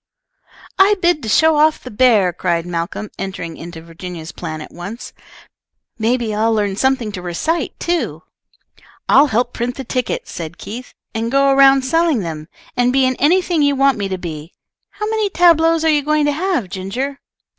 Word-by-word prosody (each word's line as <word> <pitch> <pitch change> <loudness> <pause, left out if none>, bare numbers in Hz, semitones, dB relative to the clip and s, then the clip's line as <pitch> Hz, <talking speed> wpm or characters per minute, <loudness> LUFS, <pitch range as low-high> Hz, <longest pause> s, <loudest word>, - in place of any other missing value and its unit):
"I 400 +2 +6
bid 345 -3 +2
to 220 - -5
show 320 +7 +4
off 310 +1 +3
the 255 - -8
bear," 210 -6 +3
cried 170 -1 -1
Malcolm, 175 +4 -4
entering 180 -4 -5
into 165 -1 -9
Virginia's 165 -1 -8
plan 155 0 -6
at 150 - -10
once. 200 +7 -8 0.9
"May 230 +3 +2
be 230 -3 -3
I'll 220 +2 +1
learn 205 -3 0
something 260 -1 0
to 185 - -6
recite, 180 - -2
too." 345 0 -2 0.8
"I'll 285 +2 +6
help 240 0 0
print 245 +1 -3
the 270 - -6
tickets," 255 0 -3
said 165 0 -7
Keith, 245 +4 -9 0.2
"and 225 +1 -2
go 275 0 +4
around 270 0 +6
selling 320 -2 +2
them, 155 -3 -6 0.3
and 245 0 +2
be 265 0 +3
in 255 0 +1
anything 350 +2 +2
you 285 -1 +3
want 270 -3 +2
me 200 - -1
to 190 - -2
be. 160 -2 -7 0.4
How 425 - -5
many 435 -2 0
tableaux 330 -2 +4
are - - +2
you 300 -2 +3
going 300 +1 +1
to 290 - +2
have, 320 - -1
Ginger?" 240 +10 -4
245 Hz, 180 wpm, -18 LUFS, 185-295 Hz, 0.9 s, I